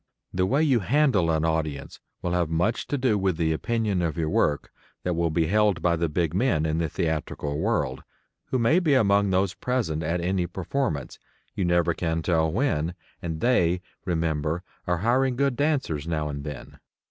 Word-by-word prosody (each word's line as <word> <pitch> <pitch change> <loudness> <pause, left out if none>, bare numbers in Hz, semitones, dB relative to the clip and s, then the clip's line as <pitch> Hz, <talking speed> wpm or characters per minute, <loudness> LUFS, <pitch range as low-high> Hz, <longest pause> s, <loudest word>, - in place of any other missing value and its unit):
The 90 0 +1
way 140 +7 +2
you 135 -6 +3
handle 120 - +2
an 80 0 +1
audience 80 -3 -2 0.2
will 90 - -1
have 85 -2 +1
much 90 +8 0
to 145 - -1
do 125 -6 +2
with 95 -4 0
the 80 -1 +1
opinion 110 +1 0
of 80 -3 -1
your 80 -2 -1
work 75 -1 +1 0.3
that 90 - 0
will 85 0 +1
be 80 +1 +1
held 105 -1 +2
by 85 -1 +3
the 85 0 -1
big 80 0 0
men 95 -7 +1
in 80 +1 0
the 85 -2 0
theatrical 75 -2 -2
world, - - 0 0.4
who 130 - -1
may 125 +9 +4
be 155 -6 +2
among 100 -4 +3
those 95 0 +1
present 115 -12 -1
at 85 +2 -1
any 90 0 0
performance, 95 - -3 0.3
you 95 - -1
never 85 -1 +2
can 80 -1 -2
tell 80 -2 +2
when 90 - 0 0.3
and 80 -2 -4
they, 90 -8 +3 0.2
remember, 80 -1 -1 0.2
are 90 0 +1
hiring 130 +2 +2
good 140 0 +1
dancers 135 - 0
now 75 -2 -1
and 70 -1 -5
then. 75 -4 -8
85 Hz, 185 wpm, -26 LUFS, 80-110 Hz, 0.4 s, may